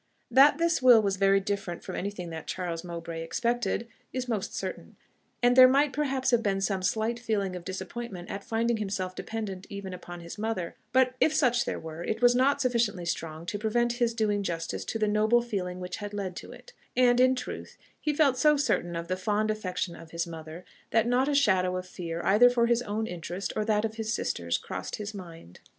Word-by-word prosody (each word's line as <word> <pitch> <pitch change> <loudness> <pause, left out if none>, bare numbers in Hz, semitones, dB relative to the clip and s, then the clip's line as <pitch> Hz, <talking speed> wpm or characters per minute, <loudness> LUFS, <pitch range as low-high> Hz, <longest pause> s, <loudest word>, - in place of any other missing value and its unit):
That 280 +2 +7
this 335 -2 +1
will 250 -3 +8
was 200 -3 0
very 195 0 +4
different 195 -3 -4
from - - -6
anything 185 -3 -4
that 160 -1 -7
Charles 175 -2 -3
Mowbray 170 -1 -6
expected, 235 +5 -1 0.2
is 255 -1 -3
most 220 -5 -2
certain, - - -5 0.5
and 245 0 +5
there 255 0 +10
might 275 +2 +3
perhaps 270 -3 0
have 240 -1 +4
been 200 -3 0
some 195 -1 0
slight 220 +5 0
feeling 205 -5 -1
of 180 - -7
disappointment 190 +1 -6
at 200 - -5
finding 230 +1 0
himself 195 -3 -3
dependent 200 -3 -5
even 200 -2 -6
upon 175 -1 -8
his 170 +4 -9
mother; 215 -6 -2 0.2
but 255 0 +4
if 315 - +3
such 245 -3 +3
there - - -3
were, 160 +1 -7
it 220 +4 -2
was 245 0 +6
not 275 +3 +3
sufficiently 235 -8 +1
strong 165 -1 -4
to 205 +4 -3
prevent 240 +2 +1
his 235 -1 +2
doing 210 -2 +1
justice 170 -4 -3
to - - -2
the 215 -1 +1
noble 215 +3 +3
feeling 185 -6 -3
which 180 0 -5
had 205 -1 -6
led 190 -3 -4
to - - -8
it; - - -14 0.2
and, 245 -1 +5
in 255 +1 +5
truth 250 - -7 0.2
he 300 - 0
felt 285 -4 +3
so 300 -1 +5
certain 215 -10 0
of 170 0 -4
the 185 - 0
fond 210 +3 0
affection 185 -4 -3
of 165 - -12
his 170 0 -2
mother, 160 +1 -9 0.2
that 225 0 +3
not 255 +3 +2
a 290 - +1
shadow 185 -9 +3
of 185 - -5
fear 170 -2 -5
either 225 +5 +6
for 240 -1 +2
his 235 0 +2
own 220 -1 -2
interest 175 0 -5
or 215 - 0
that 210 0 +1
of 220 0 -5
his 220 -1 -2
sisters 85 - -1
crossed 90 - -5
his 210 0 -6
mind. 165 - -11
210 Hz, 210 wpm, -28 LUFS, 180-240 Hz, 0.5 s, there